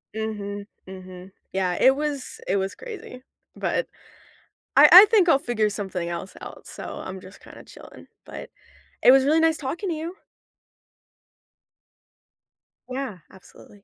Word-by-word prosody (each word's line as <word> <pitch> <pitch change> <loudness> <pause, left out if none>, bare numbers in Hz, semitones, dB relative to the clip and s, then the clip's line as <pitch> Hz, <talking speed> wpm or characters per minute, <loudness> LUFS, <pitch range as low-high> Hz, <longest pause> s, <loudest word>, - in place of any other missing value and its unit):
Mhm. 205 -2 -5 0.2
Mhm. 185 0 -11 0.2
Yeah. 185 -2 0
It 265 +1 +5
was 290 -2 -4
it 195 - +1
was 195 0 -3
crazy, 400 - -10 0.3
but - - -2 0.9
I - - +8
I 375 +3 +12
think 410 -5 +3
I'll 275 - +5
figure 220 -5 0
something 190 -4 -4
else 175 +2 -6
out. - - -11
So - - -9 0.2
I'm 190 0 -7
just 185 +2 -14
kinda - - -14
chilling, - - -15 0.2
but - - -9 0.5
it 250 - +8
was 270 0 +5
really 310 +3 +3
nice 320 -1 +2
talking 335 +8 -4
to 335 - -2
you. 330 +4 -6 2.7
Yeah. 255 -7 -5
Absolutely. 195 +1 -18
220 Hz, 140 wpm, -24 LUFS, 190-310 Hz, 2.7 s, I